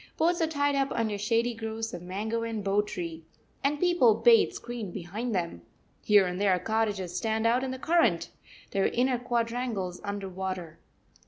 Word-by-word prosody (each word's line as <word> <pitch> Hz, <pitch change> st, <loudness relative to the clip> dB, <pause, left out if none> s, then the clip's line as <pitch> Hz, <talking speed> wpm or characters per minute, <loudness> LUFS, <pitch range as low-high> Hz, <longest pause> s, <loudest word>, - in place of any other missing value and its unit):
Boats 340 Hz, +1 st, +2 dB
are 325 Hz, -, +3 dB
tied 285 Hz, -2 st, +1 dB
up 275 Hz, -1 st, +1 dB
under 220 Hz, -3 st, 0 dB
shady 230 Hz, +4 st, +1 dB
groves 225 Hz, 0 st, -4 dB
of -, -, -6 dB
mango 210 Hz, +6 st, -3 dB
and 225 Hz, -2 st, -3 dB
bo 200 Hz, +1 st, +2 dB
tree, 165 Hz, -5 st, -6 dB, 0.4 s
and 290 Hz, +2 st, +1 dB
people 345 Hz, -11 st, +4 dB
bathe 230 Hz, +1 st, +5 dB
screened 235 Hz, -6 st, -6 dB
behind 205 Hz, +5 st, -4 dB
them. 170 Hz, -, -2 dB, 0.4 s
Here 205 Hz, -2 st, +5 dB
and 180 Hz, +1 st, -3 dB
there 195 Hz, -3 st, +4 dB
cottages 205 Hz, -2 st, -1 dB
stand 220 Hz, -1 st, 0 dB
out 240 Hz, +3 st, +3 dB
in 265 Hz, -, -2 dB
the 260 Hz, -, -4 dB
current, 335 Hz, +5 st, +2 dB, 0.4 s
their 195 Hz, -1 st, +2 dB
inner 250 Hz, 0 st, +1 dB
quadrangles 235 Hz, -6 st, -2 dB
under 200 Hz, -1 st, -4 dB
water. 185 Hz, -3 st, -5 dB
220 Hz, 170 wpm, -28 LUFS, 195-245 Hz, 0.4 s, bathe